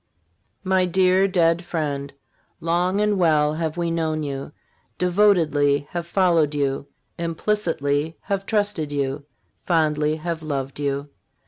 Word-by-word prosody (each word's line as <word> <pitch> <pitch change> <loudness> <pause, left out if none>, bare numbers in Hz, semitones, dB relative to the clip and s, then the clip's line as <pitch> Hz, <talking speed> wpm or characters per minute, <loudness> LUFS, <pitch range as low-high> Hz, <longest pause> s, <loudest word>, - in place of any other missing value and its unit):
My 190 -1 +2
dear, 185 +1 +3
dead 170 -2 +2
friend, 145 -5 -3 0.5
long 175 +4 +1
and 210 -2 +1
well 155 -3 +3
have 160 0 -3
we 170 -1 -1
known 160 -2 -1
you, 140 0 -5 0.5
devotedly 165 -7 +3
have 170 -1 -4
followed 170 -5 +2
you, 140 -1 -1 0.3
implicitly 165 -4 -1
have 195 -1 -3
trusted 205 -8 0
you, 140 0 -2 0.4
fondly 155 -3 +1
have 165 +1 -4
loved 140 -3 -4
you. 140 0 -2
165 Hz, 120 wpm, -23 LUFS, 145-180 Hz, 0.5 s, dear